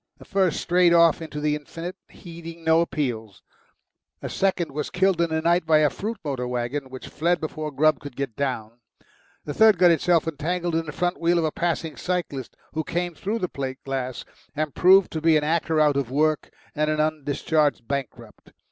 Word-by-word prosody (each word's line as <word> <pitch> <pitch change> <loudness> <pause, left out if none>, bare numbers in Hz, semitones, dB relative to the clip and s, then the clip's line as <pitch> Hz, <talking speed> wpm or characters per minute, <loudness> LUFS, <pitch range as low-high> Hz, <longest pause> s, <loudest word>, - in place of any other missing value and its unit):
The - - -15
first 190 -4 +1
strayed 175 -1 +3
off 170 -1 +5
into 155 -2 -6
the 150 0 +1
infinite, 165 +4 -7
heeding 165 -1 -10
no 160 0 +4
appeals; 120 - -3 0.8
the - - -6
second 185 -5 0
was 150 +1 -3
killed 190 -1 +2
in 170 - +1
the 160 0 -1
night 170 +1 +3
by 155 -1 +5
a 150 -1 +3
fruit 220 +3 -4
motor 130 -4 -2
waggon 125 +3 -3
which 130 0 -9
fled 170 +3 0
before 155 -1 -4
Grubb 150 0 +2
could 145 -2 -9
get 135 -5 -4
down; 120 -4 -3 0.7
the 145 - -4
third 220 0 +5
got 175 0 +6
itself 170 0 +2
entangled 170 +3 -2
in 165 0 -1
the - - -4
front 175 +4 -2
wheel 170 +1 +2
of 165 - +1
a 155 - 0
passing 165 -1 -2
cyclist, 170 -8 -3 0.2
who 160 - -1
came 175 +2 -2
through 205 +7 -3
the 185 - -2
plate 135 -4 -5
glass, 130 -2 -4 0.3
and 150 -2 -2
proved 190 +1 +5
to 160 - -4
be 160 -1 +4
an 150 - 0
actor 160 0 +1
out 150 -2 +4
of 135 -4 -1
work 155 +3 +1 0.2
and 150 +1 0
an 155 0 0
undischarged 150 -3 0
bankrupt. 140 -3 -6
155 Hz, 195 wpm, -24 LUFS, 140-170 Hz, 0.8 s, got